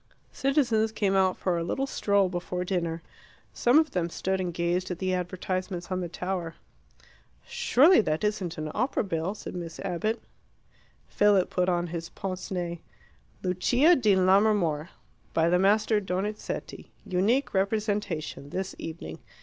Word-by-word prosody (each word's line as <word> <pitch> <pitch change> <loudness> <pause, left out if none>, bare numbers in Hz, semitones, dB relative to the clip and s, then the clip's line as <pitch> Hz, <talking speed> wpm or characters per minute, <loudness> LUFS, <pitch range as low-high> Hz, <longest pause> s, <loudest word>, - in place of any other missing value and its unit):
Citizens 245 -6 +2
came 200 -3 0
out 190 -1 +3
for 175 -2 0
a - - -2
little 270 +10 -1
stroll 200 -7 +2
before 180 0 -3
dinner. 170 -3 -2 0.5
Some 245 +4 +4
of 315 -1 +3
them 175 -2 -1
stood 190 +2 -2
and 180 -1 -2
gazed 175 +2 -1
at 180 - -3
the 185 +1 -1
advertisements 185 0 -3
on 185 0 -1
the 175 - -4
tower. 175 -1 -4 0.9
"Surely 365 - +5
that 155 -4 -1
isn't 205 -5 -1
an 155 0 -4
opera 250 +4 0
bill?" 180 0 -2
said - - -8
Miss 170 -2 -6
Abbott. 195 +5 -1 0.9
Philip 205 -3 +3
put 180 0 +1
on 175 -1 +1
his 165 -1 -5
pince 190 -2 -5
nez. 175 -2 -3 0.6
"'Lucia 245 - +4
di 215 -8 +3
Lammermoor. 185 -5 +3 0.5
By 165 0 +3
the 180 +1 +3
Master 215 +3 +3
Donizetti. 195 +2 -4 0.2
Unique 210 +9 +1
representation. 195 -7 -1
This 190 +4 -3
evening. 155 - -7
185 Hz, 145 wpm, -27 LUFS, 175-210 Hz, 0.9 s, Surely